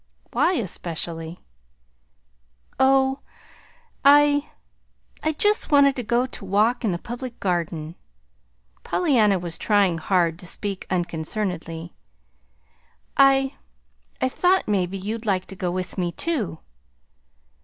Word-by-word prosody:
"Why, 370 - +2
especially?" 170 - -4 1.4
"Oh, 265 0 +3 0.8
I 290 +1 +5 0.7
I 315 - 0
just 420 +8 +1
wanted 280 -1 +5
to 250 - -2
go 240 +2 +1
to 255 - -9
walk 215 +6 +1
in 215 - +1
the 175 - -1
Public 240 +4 -7
Garden." 170 -4 -2 0.9
Pollyanna 230 - +2
was 170 -2 -5
trying 200 -6 +2
hard 170 -2 +1
to 180 - -9
speak 200 +2 -3
unconcernedly. 170 -1 -3 1.2
"I 270 0 +4 0.7
I - - +2
thought 365 +8 +2
maybe 195 -2 0
you'd 215 +4 -5
like 190 -2 +1
to 195 - -10
go 185 -1 -2
with 185 +1 -4
me, 175 -1 0
too." 230 - -1
205 Hz, 110 wpm, -23 LUFS, 175-265 Hz, 1.4 s, I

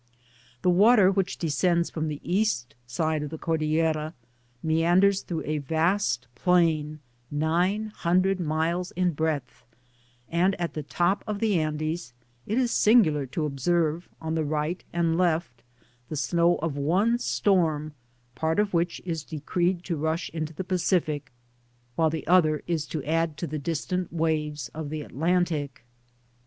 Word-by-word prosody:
The - - +4
water 200 +1 +6
whibh 190 -1 -1
descends 170 +2 +1
from 155 -1 -2
the 150 -1 -4
east 175 - 0
side 155 +5 -1
of 150 - -4
the 160 - -6
Cordillera 155 0 0 0.5
meanders 175 +5 +3
through 165 -3 -4
a 155 0 -1
vast 160 - 0
plain, 155 0 +1 0.3
nine 175 +8 0
hundred 185 +2 +2
miles 170 +2 -1
in 180 0 +1
breadth; 150 -4 -2 0.6
and 180 +3 +1
at 170 -1 -2
the 155 - -3
top 175 +6 0
of 210 -1 -2
the 210 -5 +2
Andes, 155 -3 -3 0.3
it 220 - -1
is 250 -2 +2
singular 160 - +4
to 150 +5 -2
observe 160 +3 0
on 160 0 -3
the 160 -1 0
right 155 +4 -2
and 165 0 +1
left 160 -9 0 0.5
the 155 - -4
snow 170 +4 +2
of 160 -4 -1
one 190 +12 +2
storm, 160 -10 +1 0.4
part 160 +4 -1
of 210 -2 +1
which 170 0 0
is 165 -4 -3
decreed 175 +3 -1
to 170 -3 -3
hm 160 +1 +1 0.2
into 155 -1 -3
the 165 +4 -5
Pacific, 175 -6 0 0.6
while 160 +2 +3
the 160 0 -4
other 155 -3 +3
is 160 -3 -2
to 155 -4 -4
add 160 0 0
to - - -3
the 155 -1 -4
distant 170 +4 -2
waves 155 -4 -1
of 155 +2 -6
the 155 0 -4
Atlantic. 160 -4 -1
165 Hz, 150 wpm, -26 LUFS, 155-180 Hz, 0.6 s, water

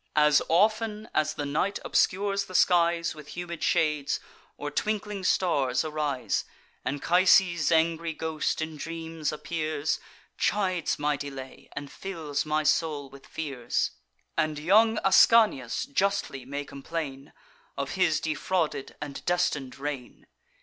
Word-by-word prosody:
As 150 -1 +5
often 215 +4 +2
as 155 0 +1
the 145 - -3
night 155 +8 0
obscures 200 +1 +1
the 185 - -10
skies 170 -2 +3
With 150 +1 -11
humid 170 -2 -5
shades, 150 -3 +1 0.4
or 145 0 -4
twinkling 210 +3 -2
stars 145 -8 +2
arise, 145 -7 -1 0.4
Anchises' 170 +2 +3
angry 165 0 +2
ghost 160 0 -2
in 160 -1 -6
dreams 165 -1 -4
appears, 155 -1 -2 0.4
Chides 185 -5 +1
my 145 0 0
delay, 135 -2 -8
and 140 0 -6
fills 160 -7 -4
my 155 0 +1
soul 150 -3 0
with 140 0 -14
fears; 140 -6 -2 0.4
And 155 -1 0
young 215 +8 +4
Ascanius 195 - +5
justly 195 -4 -1
may 140 +1 -4
complain 140 -1 -6 0.5
Of - - -2
his 180 -5 +2
defrauded 155 -1 -1
and 145 -1 -7
destin'd 140 -7 0
reign. 140 -3 -6
155 Hz, 120 wpm, -27 LUFS, 145-180 Hz, 0.5 s, As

